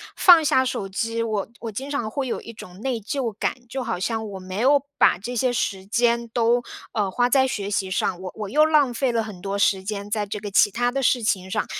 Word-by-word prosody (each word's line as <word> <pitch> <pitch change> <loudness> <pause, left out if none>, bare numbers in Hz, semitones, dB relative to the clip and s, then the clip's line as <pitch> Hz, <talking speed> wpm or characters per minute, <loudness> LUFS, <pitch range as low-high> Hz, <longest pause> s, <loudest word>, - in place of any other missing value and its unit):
放 345 -3 +7
下 260 -3 +3
手 205 -6 -3
机， 230 +4 -2
我 215 -3 -2
我 230 - -5
经 265 +7 -6
常 240 -7 -2
会 270 +4 -3
有 - - -2
一 230 - -10
种 185 -3 -12
内 260 -3 -1
疚 230 +2 -3
感。 - - 0 0.2
就 260 +2 -3
好 230 -6 -3
像 220 +3 -2
我 195 -1 -7
没 185 +1 -7
有 280 +2 +4 0.2
把 - - +5
这 240 +7 -6
些 250 +2 +1
时 200 -5 -2
间 235 +2 +1
都， 235 +1 +2 0.3
呃， 205 -3 0
花 245 +4 +2
在 265 +1 +4
学 205 -6 -3
习 195 -2 -1
上， 180 -1 -1
我 185 -1 -6
我 210 -2 -5
又 305 +7 +4
浪 295 -5 +3
费 250 +1 0
了 230 -1 +1
很 205 -5 -9
多 200 +1 -3
时 195 -1 +2
间 205 0 -5
在 210 -1 -1
这 205 +1 -5
个 205 0 -6
其 200 - +4
他 245 +3 0
的 275 +2 -1
事 245 0 +3
情 190 -3 0
上。 - - 0
225 Hz, 265 characters per minute, -23 LUFS, 200-250 Hz, 0.3 s, 放